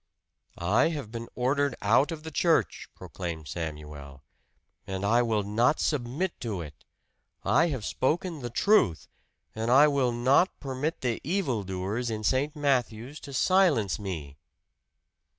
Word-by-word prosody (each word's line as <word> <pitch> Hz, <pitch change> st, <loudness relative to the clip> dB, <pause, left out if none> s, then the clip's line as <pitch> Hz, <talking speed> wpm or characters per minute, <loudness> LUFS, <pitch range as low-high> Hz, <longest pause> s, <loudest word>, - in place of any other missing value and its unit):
"I 95 Hz, -, +2 dB
have 145 Hz, -10 st, -5 dB
been 115 Hz, 0 st, -6 dB
ordered 135 Hz, +1 st, +1 dB
out 120 Hz, +9 st, +3 dB
of 155 Hz, -2 st, -6 dB
the 160 Hz, -, -7 dB
church!" 165 Hz, +2 st, +1 dB
proclaimed 85 Hz, -4 st, -6 dB
Samuel. 75 Hz, -4 st, -7 dB, 0.6 s
"And 95 Hz, +1 st, -3 dB
I 120 Hz, +4 st, +4 dB
will 110 Hz, -3 st, 0 dB
not 115 Hz, +8 st, +2 dB
submit 150 Hz, +6 st, -1 dB
to 110 Hz, -6 st, -4 dB
it! 75 Hz, -3 st, -11 dB, 0.6 s
I 130 Hz, -, +4 dB
have 130 Hz, -9 st, -3 dB
spoken 165 Hz, +4 st, -1 dB
the 120 Hz, -2 st, -5 dB
truth, 120 Hz, -, +2 dB, 0.5 s
and 110 Hz, +1 st, -3 dB
I 140 Hz, +4 st, +7 dB
will 140 Hz, -4 st, +1 dB
not 130 Hz, +10 st, +2 dB
permit 140 Hz, +3 st, -3 dB
the 120 Hz, -3 st, -1 dB
evil 155 Hz, -, -1 dB
doers 95 Hz, +6 st, -3 dB
in 110 Hz, -1 st, -4 dB
St. 135 Hz, +7 st, +1 dB
Matthew's 135 Hz, -2 st, -1 dB
to 140 Hz, -, -10 dB
silence 145 Hz, -, +2 dB
me!" 80 Hz, -8 st, -6 dB
120 Hz, 140 wpm, -28 LUFS, 100-145 Hz, 0.6 s, I